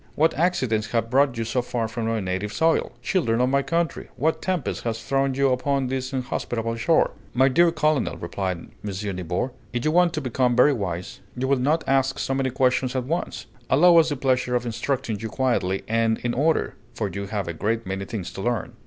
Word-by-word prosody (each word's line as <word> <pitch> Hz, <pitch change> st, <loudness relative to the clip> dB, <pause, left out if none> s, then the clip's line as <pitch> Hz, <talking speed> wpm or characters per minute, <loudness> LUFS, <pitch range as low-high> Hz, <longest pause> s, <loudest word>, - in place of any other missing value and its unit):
What 160 Hz, +2 st, +3 dB
accidents 130 Hz, -11 st, +1 dB
have 115 Hz, -1 st, 0 dB
brought 135 Hz, -2 st, +3 dB
you 115 Hz, -, -1 dB
so 120 Hz, +3 st, 0 dB
far 120 Hz, -2 st, -2 dB
from 115 Hz, 0 st, -3 dB
our 115 Hz, -1 st, 0 dB
native 95 Hz, +1 st, -3 dB
soil? 160 Hz, +9 st, +1 dB
Children 115 Hz, -12 st, +1 dB
of 125 Hz, +1 st, +3 dB
my 140 Hz, +1 st, +3 dB
country, 165 Hz, +2 st, -1 dB
what 160 Hz, +4 st, 0 dB
tempest 185 Hz, -7 st, -2 dB
has 115 Hz, -1 st, -3 dB
thrown 135 Hz, +1 st, +1 dB
you 135 Hz, 0 st, +3 dB
upon 135 Hz, +1 st, 0 dB
this 130 Hz, 0 st, -3 dB
inhospitable 120 Hz, -3 st, -2 dB
shore?" 140 Hz, +8 st, +3 dB, 0.2 s
"My 130 Hz, +2 st, +5 dB
dear 170 Hz, +5 st, +4 dB
colonel," 155 Hz, -3 st, +1 dB
replied 90 Hz, +1 st, -3 dB, 0.3 s
M. 100 Hz, -1 st, -4 dB
Nibor, 90 Hz, +8 st, -2 dB, 0.2 s
"if 120 Hz, +2 st, -2 dB
you 155 Hz, -, +3 dB
want 175 Hz, 0 st, +4 dB
to -, -, -1 dB
become 125 Hz, -2 st, +1 dB
very 140 Hz, +4 st, +5 dB
wise, 90 Hz, -6 st, -4 dB, 0.2 s
you 130 Hz, +1 st, -1 dB
will 135 Hz, -1 st, +2 dB
not 150 Hz, +6 st, +1 dB
ask 135 Hz, 0 st, +2 dB
so 135 Hz, -, -1 dB
many 135 Hz, 0 st, 0 dB
questions 130 Hz, 0 st, +1 dB
at 130 Hz, -, 0 dB
once. 165 Hz, +7 st, -3 dB, 0.2 s
Allow 170 Hz, +5 st, +6 dB
us 165 Hz, -1 st, +5 dB
the 145 Hz, -, -1 dB
pleasure 125 Hz, -2 st, +1 dB
of 120 Hz, 0 st, 0 dB
instructing 120 Hz, -1 st, -2 dB
you 110 Hz, -, -4 dB
quietly 110 Hz, -7 st, 0 dB
and 115 Hz, 0 st, +2 dB
in 120 Hz, 0 st, 0 dB
order, 155 Hz, +4 st, +1 dB, 0.2 s
for -, -, -1 dB
you 100 Hz, 0 st, -5 dB
have 100 Hz, -2 st, -3 dB
a 85 Hz, -, -3 dB
great 110 Hz, +7 st, -1 dB
many 95 Hz, +1 st, -3 dB
things 100 Hz, -3 st, -5 dB
to 95 Hz, -, -6 dB
learn." 120 Hz, -2 st, -2 dB
125 Hz, 210 wpm, -24 LUFS, 110-140 Hz, 0.3 s, Allow